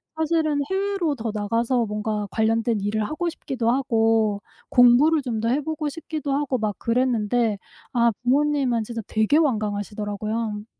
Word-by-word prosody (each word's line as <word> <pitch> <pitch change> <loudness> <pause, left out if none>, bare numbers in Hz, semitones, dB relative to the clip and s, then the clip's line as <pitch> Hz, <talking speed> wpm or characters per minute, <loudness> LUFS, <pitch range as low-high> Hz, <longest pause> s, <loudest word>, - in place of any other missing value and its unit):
사실은 315 -2 +1
해외로 390 -5 0
더 225 -2 -4
나가서 230 +4 0
뭔가 210 0 -3
관련된 225 0 +1
일을 210 +1 -1
하고 340 - -2
싶기도 260 -8 -3
하고 225 -5 +1 0.3
공부를 265 +6 +5
좀 235 -4 -3
더 230 - 0
해 280 +4 +1
보고 305 0 -3
싶기도 305 -2 -4
하고 275 -2 0
막 215 -3 -2
그랬는데 230 -3 +1 0.3
아 235 -1 +3
부모님은 270 -3 +2
진짜 230 0 -5
되게 220 +7 +2
완강하시더라고요. 210 -3 -2
235 Hz, 330 characters per minute, -23 LUFS, 215-290 Hz, 0.3 s, 공부를